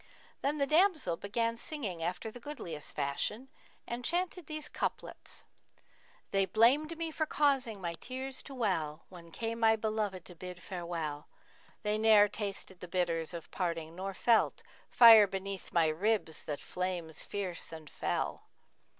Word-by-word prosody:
Then 290 +2 0
the 280 - +2
damsel 310 - +3
began 230 +5 -1
singing 225 - -1
after 180 +6 -3
the 245 - -10
goodliest 205 - -6
fashion 150 - -1 0.4
and 240 +1 -5
chanted 355 +2 -1
these 310 -1 -4
couplets, - - -4 0.9
'They 195 -1 +3
blamed 285 +10 +4
me 330 -1 -2
for 315 0 -1
causing 270 -9 +1
my 170 -2 -3
tears 260 +8 -4
to 275 - -10
well 165 -10 -1
* - - -41
When 170 -2 -12
came 230 +6 -3
my 225 -1 +5
beloved 215 -4 -2
to 180 - -7
bid 180 +1 -8
farewell: 170 -5 -4 0.6
They 210 0 +1
ne'er 215 -2 +7
tasted 195 -3 -4
the 180 - -8
bitters 170 -3 0
of 170 -2 -8
parting 165 -3 -2
nor 190 +1 -4
felt 230 +1 +3 0.2
* - - -30
Fire 225 -3 +11
beneath 195 0 -5
my 165 -2 +4
ribs 175 0 0
that 145 -2 -3
flames 180 -4 -3
fierce 190 -4 -4
and 160 -2 -9
fell! - - -2
200 Hz, 155 wpm, -32 LUFS, 170-240 Hz, 0.9 s, Fire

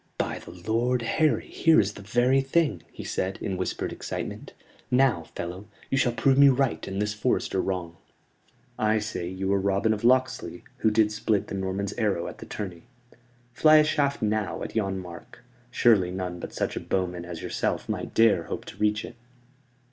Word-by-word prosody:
"By - - -2
the - - -12
Lord 115 +7 -1
Harry, 155 +6 +1
here 165 -1 +4
is 100 0 +1
the 100 - -10
very 120 +6 +2
thing," 135 - +1
he - - -8
said, 95 +1 -2
in 95 - -3
whispered 90 0 -3
excitement. - - -6 0.4
"Now, 125 -9 +3
fellow, 90 +4 -6 0.2
you 135 - +2
shall 125 - +3
prove 130 +4 +3
me 140 0 +9
right 130 - 0
and 95 0 -3
this 105 0 0
forester 105 -3 0
wrong. 90 -3 -3 0.8
I 110 0 +3
say 105 -5 -3
you 95 +2 -2
are 100 - +2
Robin 100 +3 +2
of 105 - -5
Locksley, 130 +2 +1
who 110 - +3
did 105 0 +3
split 110 -1 0
the - - -5
Norman's 95 +1 -2
arrow 100 -6 0
at - - -8
the - - -9
tourney. 90 -5 -6 0.7
Fly 155 +5 +6
a 155 - +7
shaft 140 -4 0
now 105 -1 -1
at - - -7
yon 95 -3 0
mark; 90 +2 -10 0.3
surely 110 -7 +4
none 90 -1 -4
but - - -7
such - - -2
a - - -2
bowman 90 -2 -2
as 85 -2 -7
yourself - - -2
might - - -4
dare 110 -7 +4
hope - - -5
to - - -10
reach 105 0 +1
it." 120 - -10
105 Hz, 185 wpm, -26 LUFS, 95-120 Hz, 0.8 s, me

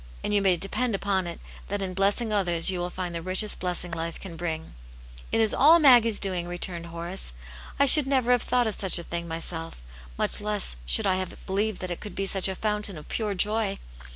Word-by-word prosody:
" - - -20
And 210 - -2
you 205 - +2
may 190 -2 +2
depend 215 +5 -2
upon 195 -2 -1
it, 170 - -7 0.3
that 205 +1 -3
in 185 -1 -4
blessing 200 +4 0
others 175 -3 +3
you 180 - -4
will 175 0 -3
find 180 -1 -6
the 170 - -4
richest 185 +4 +3
blessing 180 -1 -2
life 165 0 -5
can 185 -4 -9
bring."^ 160 -1 -5 0.3
" - - -17
It - - 0
is 220 -1 +1
all 315 +5 +6
Maggie's 240 -8 +5
doing," 185 -3 0
returned 175 -1 -5
Horace. 170 - -4 0.2
*' 60 - -16
I 280 - +5
should 285 0 +10
never 260 -3 +1
have 245 -2 +3
thought 250 -1 0
of 220 - -2
such 190 -2 +1
a 170 - -6
thing 170 0 -5
myselt 165 0 -2 0.4
Much - - -2
less 210 - -2
should - - +3
I 185 - +1
have 185 -1 -6
believed 205 +1 -2
that 185 -1 -5
it 175 - -5
could 210 - -10
be 195 - -3
such 195 0 +1
a 190 - -4
/ountain 210 -2 -1
of 150 - -13
pure 210 -3 -3
joy." 210 +1 -1
190 Hz, 235 wpm, -25 LUFS, 170-210 Hz, 0.4 s, should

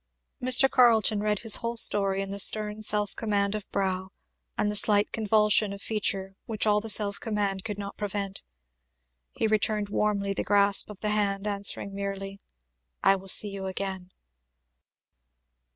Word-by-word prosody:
Mr. 255 +1 +5
Carleton 225 -5 +3
read 210 0 0
his 225 -2 +3
whole 235 0 -4
story 195 -3 +3
in 195 - -7
the 200 - -6
stern 210 +1 +3
self 210 -1 +1
command 200 -2 -1
of 210 -1 -6
brow, 190 -1 -2 0.5
and 210 - 0
the - - -5
slight 205 0 +2
convulsion 210 -1 +2
of 200 - -9
feature 195 -2 -3
which 220 -2 -2
all 210 -1 +2
the 225 - -7
self 205 -1 +1
command 205 -4 -2
could 210 -3 -5
not 200 -1 -7
prevent. 200 -1 -4 0.9
He - - -2
returned 215 -1 0
warmly 200 -1 -1
the - - -3
grasp 200 0 +3
of 210 -2 -10
the 210 - -1
hand 200 -1 -1
answering 200 -1 -1
merely, 195 0 -6 0.6
"I 195 - +5
will 195 0 -10
see 205 - +3
you 195 -1 -6
again." 190 -1 -5
205 Hz, 160 wpm, -26 LUFS, 195-215 Hz, 0.9 s, Mr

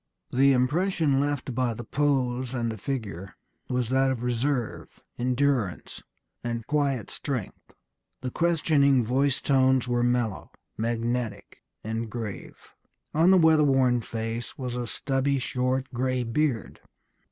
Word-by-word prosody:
The 135 +2 +5
impression 145 +3 +2
left 145 -2 -1
by 120 -2 0
the 120 - -6
pose 130 -3 0
and 115 -2 -1
the 110 - -6
figure 100 -8 -5 0.3
was 125 -2 -1
that 135 +1 +3
of 125 -2 -2
reserve, 125 0 -2 0.2
endurance, 125 -5 0 0.4
and 115 -1 -3
quiet 140 -6 0
strength. 130 -9 -5 0.5
The 125 -1 -3
questioning 145 -6 +3
voice 135 +3 +1
tones 130 -2 +3
were 120 -1 +1
mellow, 120 -4 0 0.3
magnetic, 115 0 -3 0.2
and 110 +1 -3
grave. 110 -3 -7 0.4
On 165 +4 +4
the 190 - +7
weatherworn 140 -7 +4
face 115 +1 -4
was 125 -2 -4
a 120 -1 -3
stubby, 135 +3 0
short, 130 +1 -1
gray 130 +1 0
beard.... 120 -1 -1
125 Hz, 125 wpm, -26 LUFS, 120-140 Hz, 0.5 s, the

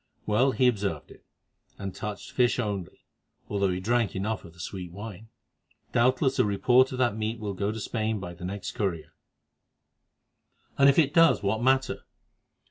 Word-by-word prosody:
Well, 115 +6 +3
he 130 - +3
observed 105 -5 -1
it, - - -16 0.5
and 100 -2 -5
touched 105 +1 -6
fish 125 -1 +2
only, 100 -7 -4 0.4
although 100 -1 +1
he 90 0 -1
drank 115 +2 0
enough 105 +2 -2
of 85 - -13
the 90 - -20
sweet 90 0 -6
wine. 105 +2 -9 0.6
Doubtless 130 +3 +2
a - - +6
report 125 +6 +3
of 130 - -4
that 120 -4 +1
meat 110 +1 -2
will 105 -2 -4
go 100 +2 -1
to 110 - -6
Spain 110 0 -2
by 90 -2 -7
the 90 +1 -12
next 100 +3 -4
courier." 90 -7 -3 1.6
"And 140 0 +6
if 140 - +3
it 150 -3 +4
does, 165 -7 +5
what 105 +3 0
matter? 130 +1 +1
110 Hz, 170 wpm, -27 LUFS, 100-125 Hz, 1.6 s, a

